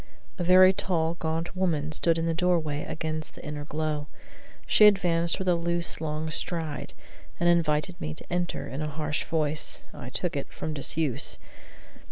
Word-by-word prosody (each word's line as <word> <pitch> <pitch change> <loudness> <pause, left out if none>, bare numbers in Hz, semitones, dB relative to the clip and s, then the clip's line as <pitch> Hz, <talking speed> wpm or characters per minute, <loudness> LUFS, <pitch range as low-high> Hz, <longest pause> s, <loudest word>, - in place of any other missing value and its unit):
A - - 0
very 185 +1 +7
tall, 165 -4 0
gaunt 165 +3 -2
woman 160 -5 0
stood 165 +2 +3
in 165 - 0
the 165 - +1
doorway 165 -4 +1
against 155 -1 -4
the - - -11
inner 150 -1 -5
glow. 150 -1 -2 0.6
She 210 - +7
advanced 170 -4 +2
with 190 - -4
a 180 - +5
loose, 170 0 0
long 155 0 -2
stride, 160 -3 -4 0.5
and 175 - +2
invited 170 0 +2
me 75 0 -3
to - - -8
enter 175 -6 -1
in 135 +3 -5
a 155 - -1
voice 155 0 -1
harsh - - -26
(I - - -7
took - - -2
it) - - -4
from 155 - -4
disuse. 145 -1 0
160 Hz, 170 wpm, -27 LUFS, 150-175 Hz, 0.6 s, very